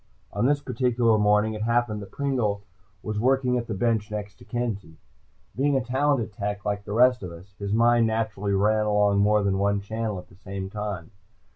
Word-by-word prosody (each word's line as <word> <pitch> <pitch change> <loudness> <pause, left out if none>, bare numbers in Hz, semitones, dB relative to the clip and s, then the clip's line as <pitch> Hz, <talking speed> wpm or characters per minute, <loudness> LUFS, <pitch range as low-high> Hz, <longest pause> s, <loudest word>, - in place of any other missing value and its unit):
On 105 +5 +1
this 145 0 +2
particular 120 -5 +2
morning, 105 +1 +3
it 105 - -5
happened 115 -2 0
that 100 - -9
Pringle 120 -8 -1 0.4
was 105 -1 -3
working 130 +1 +2
at 120 - -6
the 110 - -3
bench 110 +1 0
next 105 -2 -6
to - - -14
Kenzie. 105 -10 -4 0.6
Being 140 +1 +2
a 130 - -2
talented 130 -3 0
tech, 105 0 -4
like 100 -1 -2
the 105 - -5
rest 125 +2 +4
of 90 -3 -6
us, 90 +4 -13
his 100 -1 -3
mind 115 +1 +4
naturally 110 -3 -1
ran 105 +2 +2
along 105 -1 +3
more 105 +1 +3
than 95 -1 +1
one 100 0 +2
channel 110 0 -3
at 90 - -9
the 90 - -19
same 95 0 -6
time. 105 -4 -5
105 Hz, 195 wpm, -25 LUFS, 100-120 Hz, 0.6 s, rest